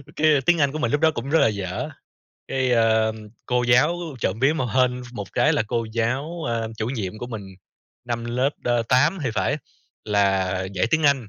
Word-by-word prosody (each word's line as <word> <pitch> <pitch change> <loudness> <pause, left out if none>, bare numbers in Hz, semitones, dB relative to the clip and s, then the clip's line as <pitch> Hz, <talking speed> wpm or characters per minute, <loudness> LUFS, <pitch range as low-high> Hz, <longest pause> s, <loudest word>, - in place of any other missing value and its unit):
cái 155 +1 +3 0.2
tiếng 170 -2 +4
Anh 140 -1 +3
của 155 - -4
mình 150 - 0
lúc 145 +1 +1
đó 160 - +5
cũng 135 -2 -5
rất 160 +2 +4
là - - +5
dở. 105 +6 -3 0.6
Cái, 130 -1 0
ờ, 110 -1 +3 0.3
cô 125 0 +1
giáo 125 +8 +4 0.2
trộm 100 0 -1
vía 135 +3 +4
mà 145 -5 -1
hên 125 -1 +2
ph 120 - -13
một 100 -3 -7
cái 150 - +3
là 150 - +2
cô 115 0 -1
giáo, 135 +9 -2
a, 115 -1 -1
chủ 110 - -1
nhiệm 110 -5 -4
của 120 - -5
mình, 110 -4 -6 0.6
năm 120 -1 -3
lớp, 125 +4 0
ơ, 120 -1 +2
8 150 +9 +3
thì 125 - 0
phải, 140 - +1 0.5
là 100 -3 +2 0.2
dạy 95 +4 +1
tiếng 160 0 +2
Anh. 140 -6 +2
125 Hz, 215 wpm, -23 LUFS, 110-145 Hz, 0.6 s, đó